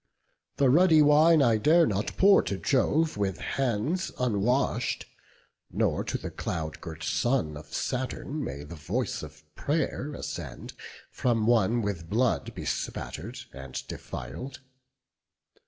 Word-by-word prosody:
The 140 - +4
ruddy 160 0 +6
wine 150 +1 +6
I 115 -3 +4
dare 160 +9 +5
not 105 -5 -2
pour 195 +1 +6
to 100 +1 -3
Jove 150 +5 +1
With 95 -4 -1
hands 135 - -1
unwash'd; 125 +1 0 0.7
nor - - 0
to - - -2
the - - -6
cloud 80 -1 -4
girt 80 -1 -8
son 120 - 0
Of 75 +1 -11
Saturn 130 +3 -3
may 70 - -5
the 75 - -10
voice 75 - -2
of - - -11
pray'r 145 - -2
ascend - - -6 0.4
From 115 -3 +1
one 115 0 +3
with 90 -5 -4
blood 120 +4 0
bespatter'd - - -4
and 65 -1 -9
defil'd. 130 0 -7
120 Hz, 125 wpm, -28 LUFS, 95-145 Hz, 0.7 s, ruddy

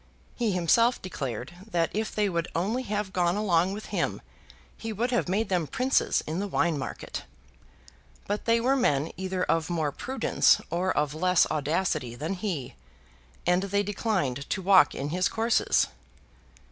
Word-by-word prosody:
He 235 -4 0
himself 230 +7 +3
declared 135 - -5 0.2
that 170 -3 0
if 220 +1 -2
they 210 -1 +2
would 170 -3 -1
only 205 +9 0
have 205 -2 -2
gone 175 0 +2
along 185 -3 +2
with 210 +1 -6
him - - 0 0.6
he 225 - -5
would 235 +4 -1
have 240 -7 0
made 210 +4 +1
them 175 -5 0
princes 260 - +1
in 160 +4 -3
the 205 - -2
wine 170 -4 +1
market. 130 - -5 1.0
But 205 +1 -3
they 230 0 +4
were 255 +4 +2
men 155 - +1
either 185 0 -2
of 165 0 0
more 160 -4 0
prudence 265 - +2
or 180 +2 0
of 150 -3 0
less 180 +2 +3
audacity 150 -5 -1
than 155 +9 -3
he, 180 - -4 0.7
and 180 +1 +3
they 200 +1 0
declined 185 - -2
to 190 - -1
walk 185 -6 +6
in 140 +2 -3
his 180 +3 +1
courses. 225 +1 +2
185 Hz, 160 wpm, -27 LUFS, 165-210 Hz, 1.0 s, walk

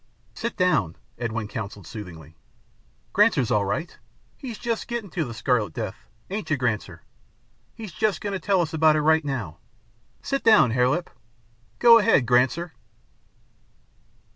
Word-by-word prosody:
"Sit 235 - -5
down," 115 - +1 0.2
Edwin 115 -2 -3
counselled 105 -3 -7
soothingly. 85 -7 -10 0.8
"Granser's 170 - +3
all 105 -3 +2
right. 140 - -3 0.4
He's 245 -6 -8
just 230 -2 -3
gettin' 235 -6 -5
to 165 -3 -2
the 120 - -7
Scarlet 115 -2 0
Death, 110 -1 -6 0.2
ain't 200 -5 -4
you, 155 - +1
Granser? 120 -5 -3 0.7
He's 215 -4 -8
just 195 +6 0
goin' 205 -1 -4
to 195 - -2
tell 195 -2 +1
us 160 -2 -3
about 155 -1 +4
it 155 - +1
right 160 +1 +3
now. 120 - -4 0.6
Sit 275 0 -2
down, 215 - +6
Hare 125 +1 +2
Lip. 175 +6 -2 0.7
Go 230 -1 +7
ahead, 210 - +3
Granser." 130 +8 +1
150 Hz, 145 wpm, -24 LUFS, -, 0.8 s, Go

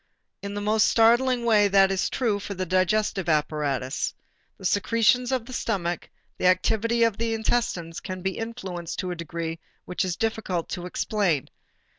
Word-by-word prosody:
In 200 0 -5
the 205 - -3
most 215 +1 +3
startling 240 +2 +4
way 210 -3 +5
that 195 -1 +5
is 190 - 0
true 225 -6 0
for 200 0 -6
the 185 0 -2
digestive 185 +1 +1
apparatus. 150 -4 -1 0.4
The 190 - -10
secretions 230 +6 +2
of 255 -3 -1
the 255 - -9
stomach, 175 -8 -2 0.3
the 185 - +3
activity 220 +5 +2
of 230 -3 +2
the 230 0 -1
intestines 220 -7 -1
can 185 -1 -6
be 190 -1 -2
influenced 190 -7 -5
to 185 - -2
a - - -3
decree 165 0 -5 0.3
which 180 - -2
it - - -2
is 175 - -2
difficult 215 -6 -2
to 180 -1 -4
explain. 180 - 0
195 Hz, 170 wpm, -25 LUFS, 175-225 Hz, 0.4 s, way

